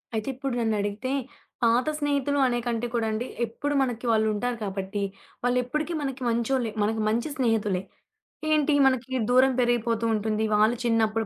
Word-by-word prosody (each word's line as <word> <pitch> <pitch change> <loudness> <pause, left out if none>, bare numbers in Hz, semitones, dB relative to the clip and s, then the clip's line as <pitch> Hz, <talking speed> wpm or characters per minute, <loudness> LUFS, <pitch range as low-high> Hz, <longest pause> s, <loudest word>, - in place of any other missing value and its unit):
అయితే 220 +2 -2
ఇప్పుడు 270 0 -3
నన్నడిగితే 215 +2 -1 0.5
పాత 235 +3 +3
స్నేహితులు 285 -1 0
అనేకంటే 240 -1 -1
కూడా 230 -2 +1
అండి 220 +3 -2 0.2
ఎప్పుడు 285 +6 -3
మనకి 245 -2 -2
వాళ్ళు 220 -1 +3
ఉంటారు 240 +3 -2
కాబట్టి 195 0 -3 0.4
వాళ్ళు 245 0 +2
ఎప్పటిక 305 +7 -2
మనకి 270 -2 -4
మంచోళ్ళే 235 0 0
మనకి 220 +1 0
మంచి 230 +7 0
స్నేహితులే. 220 -7 +1 0.7
ఏంటి 305 -1 +3
మనకి 260 -1 0 0.2
దూరం 255 +2 +5
పెరిగిపోతూ 235 -2 +1
ఉంటుంది. 215 0 0
వాళ్ళు 215 +3 +4
చిన్నప్పుడు 225 -1 +1
235 Hz, 145 wpm, -26 LUFS, 220-260 Hz, 0.7 s, దూరం